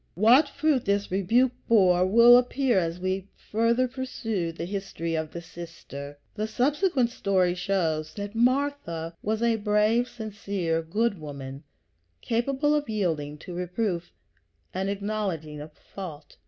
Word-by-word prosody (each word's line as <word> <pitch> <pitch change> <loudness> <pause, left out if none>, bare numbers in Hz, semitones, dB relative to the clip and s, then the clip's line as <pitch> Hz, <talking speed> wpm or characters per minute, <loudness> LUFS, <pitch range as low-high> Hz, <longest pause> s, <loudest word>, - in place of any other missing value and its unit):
What 245 - +5
fruit 295 -4 +1
this 200 0 0
rebuke 225 +7 +3 0.2
bore 185 -5 +5
will 235 +4 +8
appear 250 -2 +3
as 170 0 -2
we 185 +1 -2
further 230 +3 +1
pursue 225 -8 -3
the 165 - -5
history 185 -3 -4
of 160 -1 -2
the 170 +2 -8
sister. 165 -4 -9 0.2
The 215 0 -2
subsequent 265 - +1
story 185 -6 +1
shows 175 -4 -1
that 205 0 -5
Martha 240 - 0
was 220 +2 -1
a 230 -1 +3
brave, 210 +3 +2
sincere, 200 -8 -3
good 205 +5 -1
woman, 140 -2 -7 0.6
capable 265 +5 0
of 295 -3 0
yielding 160 -9 -1
to 180 - -7
reproof 180 0 -2 0.6
and 190 +1 -1
acknowledging 195 -7 -3
a 150 - -7
fault. 155 -1 -10
200 Hz, 135 wpm, -26 LUFS, 170-235 Hz, 0.6 s, will